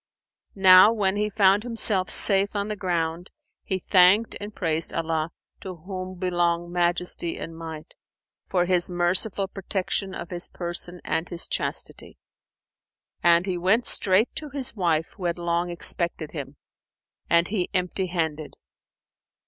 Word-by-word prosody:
Now 190 +1 +7
when 200 -4 0
he 210 +1 -1
found 200 -1 +3
himself 220 -5 +1
safe 200 0 +3
on 205 +1 -2
the 210 - -3
ground, 175 -3 -3 0.3
he 190 - -2
thanked 190 +4 +4
and 205 +1 -6
praised 165 -5 +1
Allah 160 -1 -2 0.3
(to 185 -2 -8
whom 185 +2 -8
belong 175 -1 -1
Majesty 175 -1 0
and 165 - -8
Might!) 160 -2 -9 0.5
for 180 -2 +1
His 180 -1 +3
merciful 180 +3 0
protection 190 0 -3
of 170 - -8
his 175 0 -2
person 175 0 -5
and 160 - -2
his 175 -1 -1
chastity; - - -4 1.0
and 170 +1 +4
he 180 -3 -3
went 200 +7 +2
straight 195 +4 +3
to 300 - -5
his 270 -4 -1
wife 165 -5 0
who 185 - -6
had 170 0 -1
long 170 0 -1
expected 170 -2 -2
him, 140 -2 -8 0.7
and 170 +1 +3
he 195 -4 -2
empty 185 +1 -2
handed. 160 -4 -3
180 Hz, 140 wpm, -24 LUFS, 170-195 Hz, 1.0 s, Now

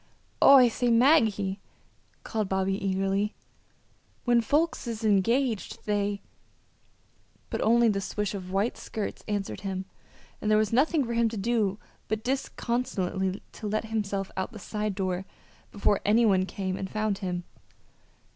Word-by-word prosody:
"Oh, 275 - +9
I 250 -2 +7
say, 240 +1 0
Maggie," 225 -6 +3 0.6
called 215 -3 -2
Bobby, 190 0 +1
eagerly, 195 +2 0 0.9
"when 240 -1 +4
folks 295 +3 0
is 230 -1 -4
engaged 220 +3 +1
they 205 -1 -1 0.6
" - - -37
But - - -2
only 235 +1 +4
the 200 -3 +1
swish 210 +1 -2
of 185 -2 -6
white 200 +5 0
skirts 215 -2 -5
answered 205 -2 -3
him, 190 -1 -3 0.6
and 215 - -1
there 215 - +5
was 215 0 +1
nothing 285 +3 +3
for 235 - -3
him 230 -1 +2
to 220 - -6
do 205 -2 0 0.3
but 220 0 -2
disconsolately 235 -7 -2
to 215 - -7
let 215 +1 -1
himself 200 -3 -2
out 190 +6 -3
the - - -8
side 210 0 -3
door 185 -2 -1 0.5
before 205 -1 +1
any 225 +3 +4
one 190 -3 +3
came 190 -1 -3
and 190 - -4
found 215 -1 -1
him. 180 -2 -3
210 Hz, 150 wpm, -27 LUFS, 195-230 Hz, 0.9 s, Oh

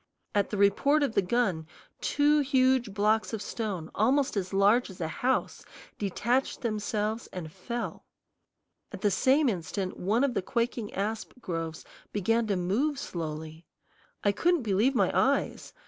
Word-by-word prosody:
At 205 -1 +1
the 210 - -3
report 275 +10 +3
of 275 - 0
the 200 - +3
gun 185 -6 0 0.3
two 295 +1 +3
huge 260 -4 +2
blocks 215 +3 +1
of 220 - -3
stone 195 -8 -4
almost 260 +5 +2
as 190 -2 -2
large 205 +5 +3
as 190 - -11
a 165 - -1
house 255 +10 -1 0.4
detached 235 +6 0
themselves 215 -1 -2
and 165 -4 -7
fell. 235 +7 -5 0.8
At - - -8
the 205 - +2
same 265 +9 +3
instant 185 -1 -2
one 215 +8 +1
of 275 -3 +1
the - - 0
quaking 235 +1 -2
asp 215 +3 -3
groves 165 -6 -4 0.3
began 225 +3 +1
to 200 - +1
move 215 +12 0
slowly. 160 - -6 0.6
I 205 - +4
couldn't 340 - +2
believe 220 +6 +2
my - - +3
eyes. - - +1
215 Hz, 150 wpm, -28 LUFS, 190-250 Hz, 0.8 s, I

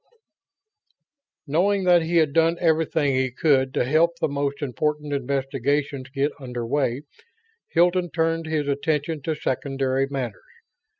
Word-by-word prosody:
VII - - -43 0.5
Knowing 190 +7 +1
that 175 -1 +5
he 165 +2 -2
had 155 -4 +3
done 165 +1 +3
everything 160 -3 +1
he 130 0 +1
could 130 0 +2
to - - +2
help 165 +5 +2
the - - 0
most 140 0 -2
important 150 +2 -2
investigations 135 0 -1
get 140 +1 0
under 125 -3 -5
way, 135 +1 -1 0.6
Hilton 175 +1 +2
turned 165 0 -1
his 155 -2 -1
attention 150 +2 -1
to 160 +3 -2
secondary 135 -1 -1
matters. 130 -7 -4
145 Hz, 135 wpm, -24 LUFS, 135-160 Hz, 0.6 s, that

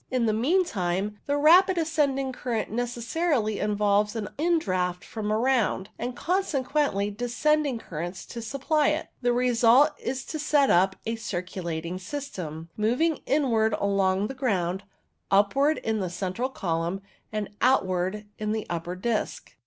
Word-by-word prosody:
In 255 -2 +1
the 215 - +2
mean 320 - +2
time, 195 - -2
the 285 0 +1
rapid 360 +5 +6
ascending 290 -5 +1
current 235 -5 -3
necessarily 240 +1 -1
involves 210 0 +1
an 215 -2 -3
indraught 185 - 0
from 215 -2 -4
around, 225 -4 +1
and 245 +1 -3
consequent 275 - 0
descending 280 +3 +1
currents 175 -2 -6
to 235 - -7
supply 275 +6 +1
it. 310 +1 -1
The 245 -1 +2
result 245 +3 +4
is 260 0 -4
to 310 - -5
set 290 -2 +3
up 190 +2 +4
a 225 +1 -2
circulating 180 -4 -4
system, 180 - -6
moving 250 +10 +1
inwards 230 -7 +2
along 195 -1 +1
the 265 - -4
ground, 195 -8 -1 0.4
upwards 240 +10 +3
in 220 -1 0
the 185 -3 -2
central 190 +8 -3
column, 175 -4 -2 0.3
and 215 -2 -3
out 255 -4 +4
wards 185 +3 -2 0.2
in 215 0 -1
the 220 -1 -3
upper 170 +1 -3
disc. 215 +4 -3
225 Hz, 145 wpm, -26 LUFS, 195-275 Hz, 0.4 s, rapid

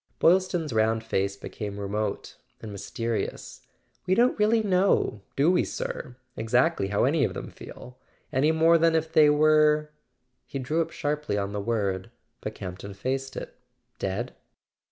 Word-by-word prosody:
Boylston's 175 -4 +2
round 110 0 +2
face 100 -3 -1
became 100 0 -6
remote 100 +1 -3 0.2
and 110 - -8
mys¬ 100 - -8
terious. 115 -2 -3 0.5
"We 185 - +3
don't 245 +4 +4
really 220 +1 +3
know—do 180 - +2
we, 180 - +3
sir?—exactly 125 0 -1
how 100 +1 +1
any 145 +3 +3
of - - -1
them - - -6
feel? 125 +1 -12 0.3
Any 145 +4 +3
more 165 +1 +5
than 165 0 +4
if 160 0 0
they 150 -1 +7
were 150 0 +4 0.3
" 125 0 -49
He - - -5
drew 150 +5 0
up 165 - -2
sharply 150 -7 -2
on 100 0 -2
the 105 - -2
word, 100 -4 -1 0.3
but - - -5
Campton 95 +2 -7
faced 135 +5 -3
it. - - -7 0.4
"Dead?" 100 +6 -3
130 Hz, 155 wpm, -26 LUFS, 105-160 Hz, 0.5 s, they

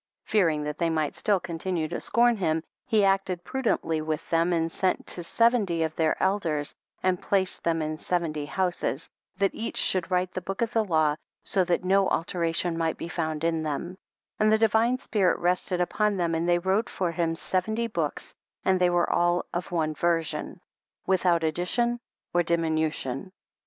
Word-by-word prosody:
Fearing 165 -8 +2
that 150 0 -4
they 170 -1 +2
might 155 -2 0
still 205 -3 +2
continue 170 -1 -2
to - - -4
scorn 235 +1 +3
him, 160 -4 0 0.2
he 215 -4 +3
acted 195 -2 +1
prudently 205 -12 -1
with 155 +1 -3
them 165 +1 +3
and 165 -1 +1
sent 185 +1 0
to 175 - -2
seventy 205 -5 +2
of 160 -1 -2
their 160 -1 +1
elders 165 -7 0 0.3
and 185 -1 +1
placed 190 -2 0
them 165 -1 +1
in 155 0 -3
seventy 155 -4 -2
houses, 175 -5 -1 0.3
that 195 0 +1
each 230 - -4
should 185 -2 +1
write 180 0 +1
the 185 - -4
book 195 +5 -2
of 230 +1 -3
the 225 - +3
law, 155 -6 +2 0.3
so 190 - +2
that 175 0 0
no 195 +1 +3
alteration 170 0 -1
might 165 -1 0
be - - -5
found 160 -3 -3
in 165 -1 +1
them, 155 +4 -3 0.4
and 215 0 +4
the 220 - +5
divine 225 +3 +3
spirit 210 -7 +1
rested 180 +1 0
upon 205 +3 +1
them, 170 -2 0
and 165 +2 0
they 175 - +4
wrote 190 +5 0
for 180 -3 -1
him 165 -1 0
seventy 215 +7 -1
books 170 -10 -3 0.3
and 185 -1 +3
they 180 - +5
were 175 0 +2
all 175 0 +2
of 175 +1 -3
one 160 -3 0
version,, 165 0 -1 0.5
without 180 -3 +2
addition 235 +9 0 0.3
or 175 - +4
diminution. 160 -2 -1
175 Hz, 180 wpm, -27 LUFS, 165-195 Hz, 0.5 s, the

